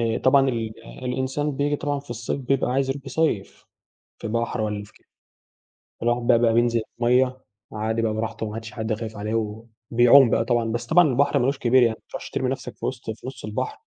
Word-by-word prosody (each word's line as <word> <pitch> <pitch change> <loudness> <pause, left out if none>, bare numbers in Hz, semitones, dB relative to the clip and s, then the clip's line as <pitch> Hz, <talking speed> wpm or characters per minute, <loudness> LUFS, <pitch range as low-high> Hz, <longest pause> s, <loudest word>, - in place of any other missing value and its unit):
آآ - - 0
طبعًا 135 0 +4
ال 115 -2 -2 0.3
الإنسان 130 +4 -1
بييجي 145 +1 +1
طبعًا 145 -1 -2
في 140 - -17
الصيف 120 +4 -3
بيبقى 130 -1 0
عايز 135 0 +1
يروح 135 0 -4
يصيّف 135 -8 -1 0.5
في - - -5
بحر 115 +1 -1
والاّ 105 -1 -2
في - - -16
كده، - - -26 1.0
الواحد 120 0 +1
بقى 120 - +5
بقى 115 -1 +3
بينزل 120 -1 +2 0.2
الميّة 125 +2 +2 0.3
عادي 110 +1 -1
بقى 110 -1 +1
براحته 110 0 -3
ما 105 - -6
عادش 115 +1 -7
حد 110 -2 -2
خايف 110 -1 -6
عليه 105 +2 -3 0.6
وبيعوم 120 +1 +7
بقى 115 - +2
طبعًا، 115 -1 0
بس 120 - -3
طبعًا 170 -1 +5
البحر 140 +2 +2
ما 120 - +1
لوش 140 +1 0
كبير 125 +1 +4
يعني 115 -2 +3
ما - - -36
تروحش - - -7
ترمي - - -1
نفسك - - -5
في - - -4
وسط - - -4
في 110 - -8
نص 130 - -8
البحر 105 0 -3
120 Hz, 210 wpm, -24 LUFS, 110-135 Hz, 1.0 s, وبيعوم